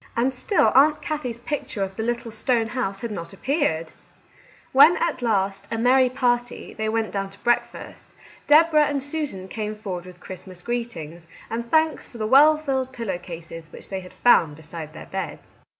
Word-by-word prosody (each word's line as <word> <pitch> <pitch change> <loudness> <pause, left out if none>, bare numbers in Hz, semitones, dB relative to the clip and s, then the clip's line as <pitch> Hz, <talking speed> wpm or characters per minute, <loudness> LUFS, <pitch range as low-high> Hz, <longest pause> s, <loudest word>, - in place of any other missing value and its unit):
And 255 +3 +2
still 290 - +2
Aunt 300 +3 +5
Kathie's 275 -7 -4
picture 235 -6 -3
of 190 0 -5
the - - -3
little 235 0 -2
stone 230 -1 0
house 200 -6 -3
had 235 - -4
not 170 -2 -6
appeared! 195 - -1 0.8
When 305 +6 +7
at 330 -6 -1
last, 200 -3 0
a 225 - -2
merry 255 +2 +4
party, 245 -2 -1
they 220 0 -2
went 225 0 -1
down 195 -1 -3
to 195 - -15
breakfast, 240 0 -2 0.4
Deborah 305 0 +6
and 280 -2 -2
Susan 285 -11 -4
came 215 +1 -4
forward 185 -4 -6
with 180 -1 -13
Christmas 185 0 -10
greetings, 175 -9 -5 0.2
and 235 +1 -3
thanks 315 -2 +2
for 240 - -12
the 215 - -2
well 290 +7 +6
filled 265 -4 -2
pillow 225 -8 -4
cases 165 -2 -9
which - - -10
they 190 - -3
had 180 -1 -11
found 165 -11 +4
beside 160 0 -8
their 160 - -9
beds. 190 0 -7
230 Hz, 180 wpm, -24 LUFS, 190-265 Hz, 0.8 s, When